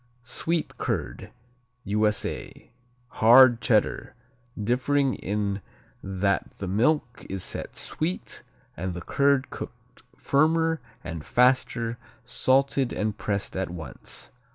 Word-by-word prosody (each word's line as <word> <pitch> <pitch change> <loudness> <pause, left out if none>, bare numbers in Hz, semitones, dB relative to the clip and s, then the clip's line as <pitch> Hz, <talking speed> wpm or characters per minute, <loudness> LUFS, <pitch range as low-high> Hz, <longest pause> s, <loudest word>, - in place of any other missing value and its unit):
Sweet 160 +6 -2
curd - - -3 0.5
U.S.A. 105 0 -1 0.4
Hard 120 0 +7
Cheddar, 110 -4 +1 0.4
differing 130 +5 +1
in 100 0 -2 0.4
that 95 +1 -1
the 100 - -5
milk 125 - +1
is 95 -1 -3
set - - -4
sweet 170 +4 -3 0.3
and 90 +1 -4
the 90 - -5
curd 140 -1 +2
cooked 125 0 -10 0.2
firmer 160 +2 +2 0.2
and 80 -2 -6
faster, 120 - +2 0.3
salted 130 +1 +2
and 105 -1 -1
pressed 100 -1 -2
at 95 -1 -2
once. 85 -2 -8
120 Hz, 105 wpm, -26 LUFS, 100-135 Hz, 0.5 s, Hard